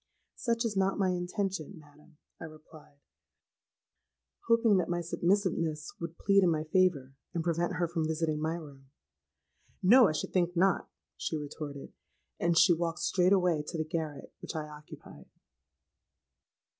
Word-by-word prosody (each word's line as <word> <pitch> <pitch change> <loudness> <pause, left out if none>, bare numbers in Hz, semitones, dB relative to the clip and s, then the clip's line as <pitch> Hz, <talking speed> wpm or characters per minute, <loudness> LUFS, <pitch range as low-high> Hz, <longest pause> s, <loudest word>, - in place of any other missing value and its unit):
'—'Such 235 -2 -1
is 215 -3 -2
not 195 0 +1
my 195 -2 +2
intention, 180 0 -3
madam,' 150 0 -19 0.2
I - - -7
replied, 155 -1 -15 1.5
hoping 230 -3 +4
that 180 -2 0
my 175 0 0
submissiveness 170 -3 -1
would 170 0 -6
plead 200 0 +3
in 180 - +4
my 155 -2 0
favour, 155 -5 +1 0.2
and 165 - -1
prevent 170 +2 0
her 175 0 0
from 165 -2 -2
visiting 155 -1 -1
my 160 +1 -1
room.—'No; 135 - -1
I 155 - 0
should 150 - -4
think 175 -1 +1
not,' 190 +1 +2 0.3
she 160 - -3
retorted; 145 -1 -7 0.5
and 170 0 +1
she 175 - +6
walked 165 0 -2
straight 180 0 +2
away 180 -5 +3
to 170 - -4
the 155 - -1
garret 155 -2 -5
which - - -7
I 155 -1 -3
occupied. 150 0 -13
165 Hz, 145 wpm, -30 LUFS, 150-185 Hz, 1.5 s, she